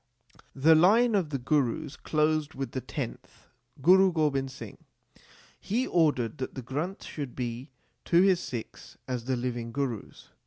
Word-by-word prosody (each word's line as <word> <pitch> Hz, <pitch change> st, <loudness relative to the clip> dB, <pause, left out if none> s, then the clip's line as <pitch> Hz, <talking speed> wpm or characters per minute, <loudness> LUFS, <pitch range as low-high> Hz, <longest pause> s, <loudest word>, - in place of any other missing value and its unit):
The 150 Hz, +4 st, +5 dB
line 215 Hz, +9 st, +5 dB
of 190 Hz, -7 st, +1 dB
the 140 Hz, -, -2 dB
Gurus 140 Hz, +2 st, 0 dB
closed 155 Hz, 0 st, 0 dB
with 135 Hz, 0 st, -4 dB
the 130 Hz, -, -3 dB
tenth, -, -, -7 dB, 0.3 s
Guru 190 Hz, +2 st, +6 dB
Gobind 145 Hz, -5 st, 0 dB
Singh. 130 Hz, -, -10 dB, 0.8 s
He 235 Hz, +7 st, -1 dB
ordered 150 Hz, -6 st, +1 dB
that 130 Hz, -, -5 dB
the 130 Hz, -, -6 dB
Granth 150 Hz, +10 st, -4 dB
should 140 Hz, -5 st, -6 dB
be 125 Hz, +2 st, -4 dB, 0.4 s
to 175 Hz, +1 st, +4 dB
his 190 Hz, -3 st, +4 dB
Sikhs 120 Hz, -9 st, -8 dB
as 125 Hz, -2 st, -3 dB
the 130 Hz, 0 st, 0 dB
living 120 Hz, -1 st, -3 dB
Gurus. 130 Hz, -5 st, -4 dB
145 Hz, 150 wpm, -28 LUFS, 125-165 Hz, 0.8 s, Guru